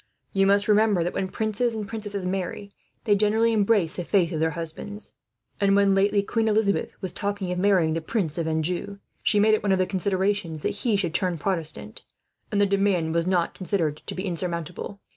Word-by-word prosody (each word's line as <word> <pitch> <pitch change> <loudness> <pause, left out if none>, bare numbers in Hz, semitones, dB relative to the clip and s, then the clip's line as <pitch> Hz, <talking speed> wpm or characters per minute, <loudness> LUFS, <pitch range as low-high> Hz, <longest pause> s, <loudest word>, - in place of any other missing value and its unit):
You 195 -1 +3
must 200 +1 +3
remember 210 -4 +3
that, 175 - -2
when 190 - -1
princes 220 +3 -1
and 210 -2 -4
princesses 205 -3 -5
marry, 190 +2 -3 0.3
they 205 - +3
generally 220 +3 +2
embrace 205 -5 +2
the 180 - -2
faith 175 -1 +2
of 160 - -2
their 160 +1 +2
husbands; 170 +6 -6 0.5
and 200 -1 +3
when, 200 -1 +4
lately, 200 +1 +2
Queen 225 +2 0
Elizabeth 210 -2 0
was 185 - -2
talking 200 -3 -3
of 180 - -2
marrying 180 -5 +3
the 165 - -2
Prince 170 -3 -2
of 165 - -1
Anjou, 175 +5 -2 0.2
she 210 - +2
made 215 +1 +4
it 215 - +2
one 200 - 0
of 190 - +4
the 185 - +2
conditions 190 -3 -1
that - - -1
he 230 -4 +2
should 180 -5 -1
turn 180 -2 0
Protestant, 165 -1 -2 0.5
and 205 - +1
the 205 - +5
demand 195 -5 +1
was 170 +1 +1
not 180 -2 +1
considered 175 -6 -1
to - - -4
be 185 - -4
insurmountable. 175 +2 -4
195 Hz, 200 wpm, -25 LUFS, 175-205 Hz, 0.5 s, the